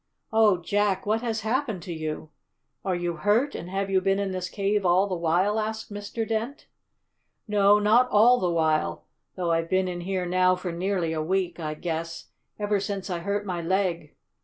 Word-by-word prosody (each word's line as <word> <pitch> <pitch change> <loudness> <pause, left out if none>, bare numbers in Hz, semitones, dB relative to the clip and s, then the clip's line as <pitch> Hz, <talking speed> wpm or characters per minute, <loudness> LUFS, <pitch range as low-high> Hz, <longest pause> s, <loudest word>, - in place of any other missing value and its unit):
"Oh, 220 -4 +5
Jack, 195 +2 0
what 215 +2 +1
has 230 -2 -2
happened 220 -4 -1
to 180 - -5
you? 155 -1 -5 0.5
Are 190 -2 0
you 175 -1 -2
hurt, 220 - +2
and 175 - -6
have 195 +1 -2
you 190 -1 +3
been 195 +1 +2
in 200 -1 -1
this 185 -1 -3
cave 200 0 0
all 180 +2 +4
the 195 - -4
while?" 180 +5 +1
asked 220 -1 -4
Mr. 205 +2 -4
Dent. 230 +5 -3 0.8
"No, 205 -1 +5
not 220 +5 +4
all 240 +4 +5
the 180 - 0
while, 160 -2 0 0.3
though 175 -2 -1
I've 165 0 0
been 185 0 +2
in 175 -1 -4
here 185 0 -2
now 185 +1 +3
for 180 -1 -5
nearly 175 -1 -1
a 155 - -1
week, 180 +1 -1
I 155 -2 -3
guess, 165 0 -5 0.3
ever 205 -1 0
since 195 -1 -4
I 175 - -2
hurt 200 +3 -2
my 180 -3 -3
leg. 170 -3 -1
190 Hz, 190 wpm, -26 LUFS, 175-205 Hz, 0.8 s, Oh